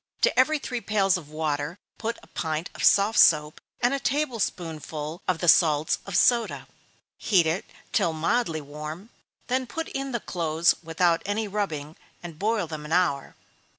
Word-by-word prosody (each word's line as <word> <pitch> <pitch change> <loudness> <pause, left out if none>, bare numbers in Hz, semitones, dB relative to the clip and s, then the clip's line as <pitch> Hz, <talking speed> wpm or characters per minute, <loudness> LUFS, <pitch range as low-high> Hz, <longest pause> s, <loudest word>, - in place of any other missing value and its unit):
To - - +3
every 305 +4 +4
three 250 -4 -4
pails 195 -4 +2
of 165 -5 -6
water 155 +1 -2 0.2
put 230 +1 -3
a - - -20
pint 160 0 -3
of - - -6
soft 205 +3 +4
soap, 150 -1 +4 0.2
and 245 +2 +3
a 275 - 0
table 270 -2 -1
spoonful 160 -3 -4
of 185 - +1
the 175 - -3
salts 155 -2 +4
of 185 -3 -1
soda. 235 -2 +2 0.5
Heat 185 -6 +3
it 160 +4 -1 0.3
till 170 - +2
mildly 165 +1 0
warm, 150 - -8 0.3
then 255 0 -1
put 325 +4 -5
in 275 0 -4
the 235 - -1
clothes 165 -3 +1
without 165 0 +1
any 210 +2 -2
rubbing, 160 -7 -3 0.3
and 165 -3 -9
boil 215 -1 0
them 155 -2 -7
an 150 - -9
hour. 165 -6 +1
175 Hz, 170 wpm, -26 LUFS, 155-220 Hz, 0.5 s, every